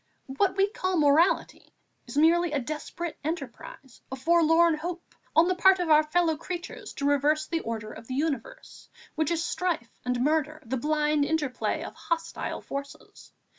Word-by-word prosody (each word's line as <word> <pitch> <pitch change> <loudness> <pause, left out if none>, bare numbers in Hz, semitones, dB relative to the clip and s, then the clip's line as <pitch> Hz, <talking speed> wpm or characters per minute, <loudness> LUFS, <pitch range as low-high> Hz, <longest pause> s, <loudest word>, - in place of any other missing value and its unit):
What 390 +2 +2
we 390 0 +4
call 370 -3 -2
morality 305 +4 +2 0.3
is - - -7
merely 335 +2 +4
a 290 - +1
desperate 310 +5 -5
enterprise, 275 -4 -7
a - - -3
forlorn 330 +3 +4
hope, 350 +2 -6 0.2
on 325 +2 +6
the 370 - +2
part 380 +1 +5
of 350 -3 -1
our 305 0 +7
fellow 320 +1 +1
creatures 350 +2 -7
to 280 - -4
reverse 295 +2 +2
the 330 +1 -2
order 220 -5 -5
of 230 - -12
the 255 - -4
universe, 325 - -4 0.2
which 315 -2 0
is 340 0 0
strife 345 -9 -2
and 250 0 -1
murder, 310 +1 0
the 245 +4 -2
blind 300 +2 +1
interplay 290 -4 -1
of - - -7
hostile 330 -1 -3
forces. 280 0 -8
310 Hz, 165 wpm, -27 LUFS, 285-345 Hz, 0.3 s, our